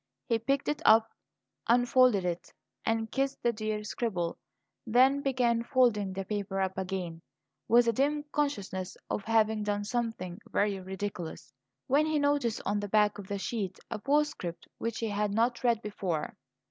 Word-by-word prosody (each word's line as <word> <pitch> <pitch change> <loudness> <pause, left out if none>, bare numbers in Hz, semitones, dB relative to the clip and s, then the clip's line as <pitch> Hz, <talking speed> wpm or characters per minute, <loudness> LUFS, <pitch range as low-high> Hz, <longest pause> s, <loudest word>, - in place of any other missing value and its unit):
He 230 - +1
picked 275 +5 0
it 295 - -1
up, 225 0 +6 0.6
unfolded 245 -4 +4
it, 175 -1 -3 0.4
and 225 -1 0
kissed 275 0 -1
the 235 - +2
dear 215 -1 -3
scribble; 195 -6 -2 0.5
then 260 +5 +5
began 245 -4 +1
folding 235 -5 +2
the 195 0 -4
paper 200 -1 -3
up 190 -1 0
again, 185 -3 -4 0.5
with 235 +1 +5
a 230 - +3
dim 290 +5 +1
consciousness 200 -11 -2
of 205 - -1
having 220 -1 +2
done 205 0 -1
something 220 -5 -3
very 205 -1 +1
ridiculous, 190 -6 -6 0.3
when 295 +4 +3
he 310 -1 +1
noticed 285 -6 +1
on 205 +1 +1
the 205 0 -4
back 210 0 +3
of 195 - -8
the 200 - -2
sheet 195 -2 -3
a 225 - -3
postscript 280 - -1
which 230 -1 -2
he 225 - -2
had 205 0 -1
not 235 +2 +1
read 235 -2 +2
before. 185 -7 -3
220 Hz, 160 wpm, -30 LUFS, 195-245 Hz, 0.6 s, up